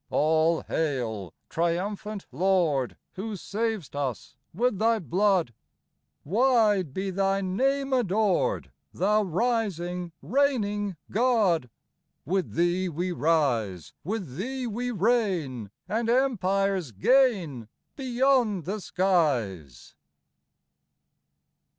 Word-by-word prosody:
All 160 +2 +2
hail, 120 - -2 0.2
triumphant 195 +5 -2
Lord, 160 -4 +1
Who 210 +3 -5
sav'st 210 - -3
us 135 -3 -4 0.2
with 220 +1 0
Thy 225 +1 +3
blood! 185 - +1 0.7
Wide 210 - +3
be 190 +6 -3
Thy 195 +1 +1
name 270 +9 0
adored, 215 -5 +1 0.2
Thou 210 +4 +2
rising, 180 -4 -1
reigning 210 - 0 0.2
God! 205 - +2 0.6
With 185 +5 -1
Thee 175 +2 +1
we 175 +3 -2
rise, 130 - 0
With 185 - -4
Thee 255 +6 -3
we 240 +2 -3
reign, 190 - 0 0.2
And 225 +4 -1
empires 195 - +1
gain 175 - +2 0.3
Beyond 250 - +1
the 205 +4 -3
skies. 130 - 0
190 Hz, 90 wpm, -27 LUFS, 160-225 Hz, 0.7 s, Thy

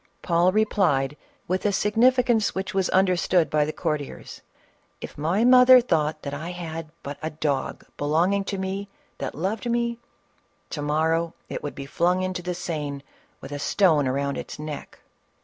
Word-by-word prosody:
Paul 175 +1 +3
replied 180 -10 +1 0.3
with 185 +1 -1
a 205 - +2
significance 230 +2 +3
which 190 +2 -3
was 190 -1 +1
understood 180 -2 +2
by 150 -1 +3
the 155 - -3
courtiers, 150 -2 -4 0.6
"If - - -8
my 170 +9 +1
mother 255 0 +8
thought 155 -9 0
that 140 - -4
I 155 +4 -5
had 165 -3 -6
but 140 0 -6
a 155 - -2
dog 150 -3 -2
belonging 170 +7 +1
to 200 - -3
me 190 +1 -4 0.3
that - - -4
loved 205 +9 -2
me, 235 0 0 0.7
to 150 - -4
morrow 160 +3 0
it - - -4
would 145 - -5
be 140 - -6
flung 180 +6 +1
into 185 -1 -3
the 180 0 -3
Seine 150 -5 -4 0.4
with 135 - -9
a 145 - -4
stone 155 -4 +3
around 140 +2 -1
its - - -7
neck." 150 -1 -7
170 Hz, 165 wpm, -25 LUFS, 150-195 Hz, 0.7 s, mother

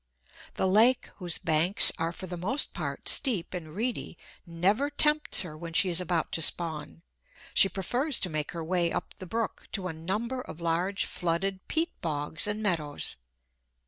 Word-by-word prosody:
The 190 - +1
lake, 225 +6 +3
whose 175 -4 -1
banks 170 +2 +2
are 165 +1 -1
for 180 - -8
the 180 -1 -6
most 210 +12 0
part - - -5
steep 205 - +5
and 160 -3 -7
reedy, 230 -5 -3 0.3
never 195 +12 +1
tempts 300 +1 +4
her 160 -4 -8
when 165 +1 -8
she 185 +3 +3
is 175 0 +5
about 175 -2 -1
to 165 - -1
spawn. 155 - 0 0.5
She 195 - +5
prefers 245 - 0
to 185 - -1
make 155 -1 -2
her 165 -1 -4
way 170 0 0
up - - -4
the 185 - -8
brook 225 +4 -3
to 185 -3 -2
a - - -5
number 210 +11 -3
of 170 - -10
large 175 +4 0
flooded 185 +3 -2
peat 330 +1 +1
bogs 155 +2 -2
and 210 +1 -2
meadows. 155 -7 0
180 Hz, 175 wpm, -28 LUFS, 165-210 Hz, 0.5 s, steep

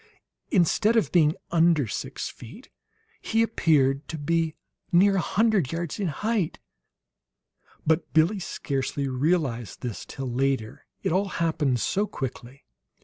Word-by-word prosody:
Instead 210 +5 +3
of 225 - +2
being 160 -3 +4 0.2
under 165 -4 +4
six - - -4
feet, 170 - -12 0.5
he 225 +1 +2
appeared 145 -10 +2
to 160 - -5
be 165 +1 0 0.4
near 195 +3 +5
a - - +2
hundred 210 - +2
yards 170 0 -4
in 195 - 0
height; 205 +3 -1 1.3
but 160 +2 +1
Billie 165 +6 +3
scarcely 140 -4 -3
realized 130 - -1
this 115 -7 -4
till 135 - -7
later, 135 0 -1 0.2
it - - 0
all 190 +4 +1
happened 155 -6 +1
so 205 - 0
quickly. 130 -2 -7
160 Hz, 130 wpm, -26 LUFS, 135-185 Hz, 1.3 s, near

